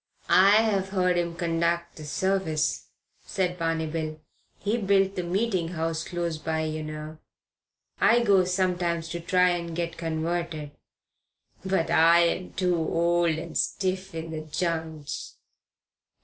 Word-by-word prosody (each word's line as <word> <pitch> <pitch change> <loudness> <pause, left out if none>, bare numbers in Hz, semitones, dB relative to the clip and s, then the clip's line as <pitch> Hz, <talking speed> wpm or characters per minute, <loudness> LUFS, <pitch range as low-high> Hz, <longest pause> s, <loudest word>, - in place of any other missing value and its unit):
"I've 200 0 +5
heard 180 -2 +2
him 170 -1 -1
conduc' 170 0 0
the 155 - -10
service," 185 -1 0 0.4
said 180 -3 -2
Barney 165 -1 0
Bill. 155 0 -4 0.4
"He 215 +4 -1
built 195 -1 +2
the 180 - -1
Meeting 185 0 0
House 165 0 -2
close 170 -3 -3
by, 160 0 -1
yer 155 0 -3
know. 155 0 -7 0.8
I 240 +1 +5
goes 190 -4 +3
sometimes 175 -3 0
to 170 0 -4
try 180 +2 +3
and 170 -2 -2
get 170 -1 -3
converted. 165 -2 -3 0.9
But 190 -3 0
I'm 170 +2 +4
too 180 -2 +1
old 170 0 +1
and 165 0 -7
stiff 185 -1 -1
in 160 0 -5
the 155 -1 -4
j'ints. 160 -2 -4
170 Hz, 130 wpm, -26 LUFS, 160-185 Hz, 0.9 s, I've